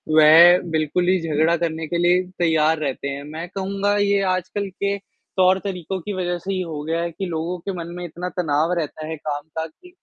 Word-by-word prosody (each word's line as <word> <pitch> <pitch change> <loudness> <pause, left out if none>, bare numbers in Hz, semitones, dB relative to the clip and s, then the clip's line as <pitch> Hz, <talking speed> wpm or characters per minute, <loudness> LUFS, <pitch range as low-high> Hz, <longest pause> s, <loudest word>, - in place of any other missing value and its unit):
वह 165 +3 +8
बिल्कुल 160 +3 0
ही 185 0 +3
झगड़ा 160 +1 +2
करने 160 -1 -2
के 170 - -1
लिए 175 +1 +4 0.2
तैयार 160 -1 +3
रहते 140 -2 -3
हैं। 140 0 -4
मैं 155 +3 -7
कहूँगा 195 +2 -1
ये 200 -1 +2
आजकल 190 +2 -3
के, 200 +2 -2
तौर-तरीकों 190 -1 -1
की 205 +5 -5
वज़ह 180 -2 -2
से 195 +3 -4
ये 185 - -1
हो 160 -4 -5
गया 165 +2 -1
है 170 0 -2
कि 180 +4 -5
लोगों 170 +1 -3
के 195 +4 -4
मन 170 -1 -5
में 180 - -5
इतना 175 +2 -5
तनाव 160 0 +1
रहता 155 0 -5
है 160 - -4
काम 145 -1 -4 0.2
का 160 - -1
कि, 360 - -19
170 Hz, 210 wpm, -22 LUFS, 160-185 Hz, 0.2 s, वह